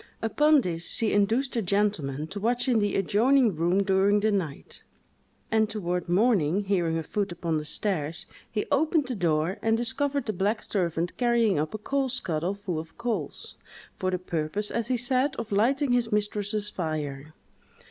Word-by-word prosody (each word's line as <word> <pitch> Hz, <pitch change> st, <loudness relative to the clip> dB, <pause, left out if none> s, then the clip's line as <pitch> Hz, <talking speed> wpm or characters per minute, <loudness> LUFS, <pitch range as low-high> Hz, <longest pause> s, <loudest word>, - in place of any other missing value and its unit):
Upon 295 Hz, +6 st, +4 dB
this, 170 Hz, -5 st, -3 dB
she 225 Hz, -2 st, +3 dB
induced 225 Hz, +7 st, +1 dB
a 230 Hz, -, +1 dB
gentleman 180 Hz, -8 st, 0 dB
to 205 Hz, -, -5 dB
watch 240 Hz, +4 st, 0 dB
in 240 Hz, -3 st, +3 dB
the 205 Hz, -1 st, 0 dB
adjoining 225 Hz, +3 st, +3 dB
room 175 Hz, +5 st, +2 dB
during 195 Hz, +1 st, +3 dB
the 215 Hz, +1 st, +2 dB
night; 170 Hz, -8 st, -4 dB, 0.7 s
and 220 Hz, -1 st, +3 dB
toward 180 Hz, -5 st, -3 dB
morning, 195 Hz, -2 st, +2 dB
hearing 175 Hz, -5 st, 0 dB
a 165 Hz, -, -2 dB
foot 200 Hz, +4 st, -2 dB
upon 165 Hz, -2 st, -2 dB
the 150 Hz, -, -7 dB
stairs, 160 Hz, -3 st, -1 dB, 0.3 s
he 210 Hz, -, -1 dB
opened 305 Hz, +1 st, +2 dB
the 255 Hz, -, -2 dB
door 170 Hz, +1 st, 0 dB
and 225 Hz, 0 st, +2 dB
discovered 280 Hz, +3 st, 0 dB
the 215 Hz, -, -2 dB
black 205 Hz, +4 st, 0 dB
servant 170 Hz, -3 st, -1 dB
carrying 235 Hz, -7 st, +2 dB
up 155 Hz, +6 st, -2 dB
a -, -, -2 dB
coal 270 Hz, +5 st, -1 dB
scuttle 180 Hz, -6 st, -2 dB
full 185 Hz, -5 st, -4 dB
of 160 Hz, +1 st, -10 dB
coals, 225 Hz, -11 st, -4 dB, 0.5 s
for 185 Hz, -, 0 dB
the 185 Hz, -, 0 dB
purpose, 175 Hz, +3 st, -3 dB
as 235 Hz, -1 st, -1 dB
he 255 Hz, 0 st, +1 dB
said, 260 Hz, +3 st, +1 dB
of 225 Hz, -, -6 dB
lighting 255 Hz, +7 st, +2 dB
his 240 Hz, -2 st, +1 dB
mistress's 210 Hz, 0 st, -1 dB
fire. 155 Hz, -3 st, -4 dB
205 Hz, 175 wpm, -27 LUFS, 175-235 Hz, 0.7 s, Upon